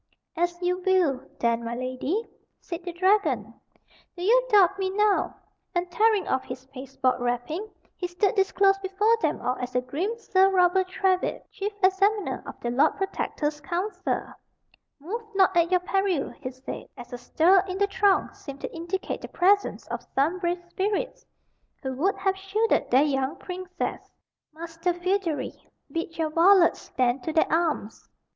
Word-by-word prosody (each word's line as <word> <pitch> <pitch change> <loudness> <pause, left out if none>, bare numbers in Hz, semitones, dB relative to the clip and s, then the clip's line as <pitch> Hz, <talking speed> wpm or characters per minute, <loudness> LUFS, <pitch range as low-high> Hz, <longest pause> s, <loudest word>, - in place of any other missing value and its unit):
"As 345 +1 -1
you 360 +1 +1
will, 355 -9 +1
then, 235 0 +1
my 230 +1 -4
lady," 255 - -2 0.3
said 340 0 -6
the 355 - -4
dragon. 385 +4 +1 0.6
"Do 350 - -5
you - - +4
doubt 390 -3 +5
me 380 -1 0
now?" 415 +1 +1 0.4
and, 350 0 -1
tearing 430 +2 +3
off 260 - 0
his 255 +1 -8
pasteboard 265 -1 -2
wrapping, 245 - -2 0.3
he 360 - -3
stood 355 +3 +1
disclosed 390 0 +3
before 400 +4 +2
them - - 0
all 250 +1 -1
as 250 0 -5
the 250 - +2
grim 335 - -3
Sir 385 -4 +3
Robert 370 0 +3
Trywhitt, 370 0 0
chief 410 -1 -3
examiner 390 +2 +2
of - - -9
the 240 - -2
Lord 280 +6 +3
Protector's 300 -6 -2
council. 355 +8 -2 0.8
"Move 390 +11 -4
not 380 -1 +4
at 340 -1 +4
your 365 -1 +3
peril," 380 -5 0
he 265 -3 -7
said, 260 +1 -8
as 245 0 -10
a - - -4
stir 330 +9 +4
in 370 0 -4
the 405 - +3
throng 395 -1 +2
seemed 280 -1 -10
to - - -6
indicate 345 +3 -4
the - - -6
presence 400 +3 +2
of - - -4
some 310 +7 +2
brave 350 0 -2
spirits 405 +7 -2 0.6
who 265 -1 -2
would 355 +10 +1
have 385 -1 0
shielded 390 +4 0
their 260 +3 +5
young 270 0 0
princess. 365 0 -5 0.4
"Master 330 +2 -3
Feodary, 360 -3 -1 0.4
bid 330 0 -4
your 320 -2 -1
varlets 345 +2 +5
stand 250 0 0
to 320 - -3
their 315 - +2
arms." 320 -10 -1
355 Hz, 165 wpm, -26 LUFS, 285-390 Hz, 0.8 s, doubt